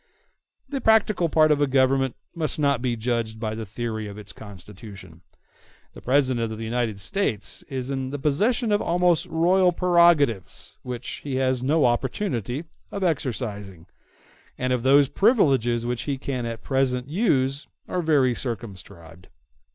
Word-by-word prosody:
The 275 -1 -4
practical 215 -6 +3
part 155 0 +4
of 145 -1 +2
a 145 - +3
Government 135 -1 +2 0.2
must 155 -4 -1
not 140 -4 +1
be 125 -2 -1
judged 115 -1 -2
by 110 -1 -3
the 110 -1 -6
theory 110 0 -4
of 100 0 -9
its 100 -2 -10
constitution. 100 -3 -12 0.7
The - - -12
President 125 -4 +1
of 110 - -6
the 115 - -6
United 115 -3 -2
States 105 - -2
is 130 0 -4
in 135 -1 -3
the 145 - -4
possession 210 - +1
of 205 - +2
almost 175 0 +2
royal 180 +2 +3
prerogatives, 170 - +2
which 125 -1 -6
he 140 -3 -3
has 130 -1 +1
no 145 +3 +2
opportunity 125 - -1 0.3
of 200 - -4
exercising; 105 - -3 0.7
and 130 0 0
those 135 +3 +4
privileges 135 - +2
which 120 -1 -2
he 140 - -1
can 130 -3 -4
at 115 -1 -6
present 130 -2 0
use 145 - 0 0.2
are 180 - -2
very 145 -6 +3
circumscribed. 95 -8 -8
130 Hz, 150 wpm, -24 LUFS, 115-155 Hz, 0.7 s, part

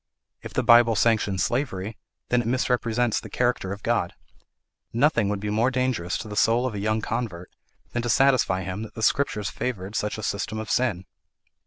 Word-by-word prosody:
If - - -9
the - - +1
Bible 120 -1 +6
sanctions 105 -4 +2
slavery, 110 -5 -2 0.3
then 125 0 +3
it 115 - -5
misrepresents 120 -2 +1
the - - -10
character 120 -6 0
of 100 0 -6
God. 115 -7 0 0.8
Nothing 120 -4 +2
would 105 -1 -1
be 105 +1 -3
more 115 +4 +2
dangerous 125 -8 -1
to - - -7
the 105 - -6
soul 115 +4 +3
of 130 - -2
a 105 - -4
young 110 +2 0
convert 110 -7 -4 0.4
than 120 - -1
to 120 - -3
satisfy 130 -9 +3
him 95 +3 -4
that 110 - -8
the 110 - -5
Scriptures 105 -6 +1
favoured 105 -4 -4
such 105 0 -1
a 110 - -6
system 100 +2 -2
of 110 0 -4
sin." 110 -8 0
110 Hz, 190 wpm, -25 LUFS, 100-120 Hz, 0.8 s, Bible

